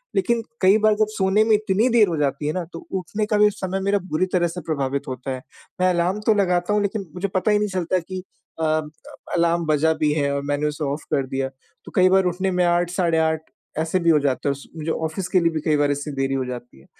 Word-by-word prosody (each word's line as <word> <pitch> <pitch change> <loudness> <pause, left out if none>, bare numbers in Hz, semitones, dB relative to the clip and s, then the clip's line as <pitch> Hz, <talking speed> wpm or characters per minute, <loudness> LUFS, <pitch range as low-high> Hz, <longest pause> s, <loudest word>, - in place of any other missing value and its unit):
लेकिन 235 -12 +1 0.2
कई 190 +3 +6
बार 215 0 +5
जब 215 -1 +3
सोने 205 0 +2
में 220 -1 +3
इतनी 210 +2 +1
देर 225 -4 +5
हो 170 - -1
जाती 145 0 -1
है 155 - 0
ना, 180 - -2
तो 165 - -6
उठने 190 +3 -2
का 210 0 +1
भी 210 0 +6
समय 195 -1 -3
मेरा 200 +1 +2
बुरी 155 +4 +2
तरह 175 -1 +3
से 175 +1 -6
प्रभावित 140 -3 -2
होता 130 +1 -5
है। 130 -1 -4 0.4
मैं 185 - +4
अलार्म 180 +3 +1
तो 220 - +6
लगाता 180 -1 +1
हूँ, 210 - +2
लेकिन 200 0 -2
मुझे 185 +2 -2
पता 190 +2 0
ही 210 - +4
नहीं 210 -1 0
चलता 185 0 0
कि 185 +2 -6 0.4
अ, - - +2 0.7
अलार्म 170 0 +2
बजा 155 +1 +2
भी 150 -1 +3
है 140 -2 0
और 140 - -1
मैंने 145 +1 0
उसे 150 +1 -4
ऑफ़ 140 +2 -3
कर 135 -2 +1
दिया। 135 0 -2 0.4
तो - - -10
कई 185 0 +5
बार 190 0 +4
उठने 190 +1 -1
में 180 0 +2
8 175 0 +2
साढ़े 170 -3 +1
8 160 0 +1 0.4
ऐसे 160 +4 0
भी 170 -1 +2
हो 155 - +5
जाता 140 -1 -1
है - - +3
उस 140 0 -7
मुझे 160 +1 -2
ऑफ़िस 160 +4 -3
के 185 - +4
लिए 170 -1 +2
भी 160 - -2
कई 155 -2 +3
बार 145 0 +2
ऐसी 145 +1 -3
देरी 135 0 -1
हो 130 -1 -1
जाती 125 - -8
है। 70 - -20
175 Hz, 260 wpm, -22 LUFS, 150-190 Hz, 0.7 s, कई